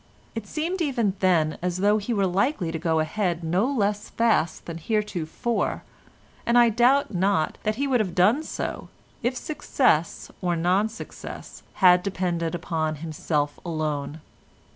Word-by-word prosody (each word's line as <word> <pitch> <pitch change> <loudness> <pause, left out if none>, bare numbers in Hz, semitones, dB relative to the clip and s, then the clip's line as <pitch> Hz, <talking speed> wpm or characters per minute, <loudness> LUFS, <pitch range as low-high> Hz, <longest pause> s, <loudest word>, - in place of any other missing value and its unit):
It 225 -2 -5
seemed 335 - -2
even 245 - +1
then 165 -5 +2
as 180 0 -1
though 205 +3 +3
he 210 +4 -4
were 200 -4 +2
likely 190 - 0
to 165 - -3
go 160 -1 +1
ahead 170 +1 -1
no 185 +11 +1
less 210 -5 -1
fast 225 -8 +1
than 165 -1 -6
heretofore, 210 +2 -2 0.6
and 235 +1 +3
I 240 -1 +7
doubt 245 +3 +3
not 185 -3 +1
that 215 0 -1
he 280 +5 -1
would 260 -3 +2
have 185 -5 -1
done 210 +11 +4
so, - - -5 0.3
if 245 +2 -1
success 250 - 0
or 175 -2 0
non 185 +6 +2
success 225 - -9 0.2
had 180 0 +8
depended 175 -3 -2
upon 160 -2 -2
himself 150 -1 -2
alone. 155 -2 -3
185 Hz, 150 wpm, -25 LUFS, 165-230 Hz, 0.6 s, had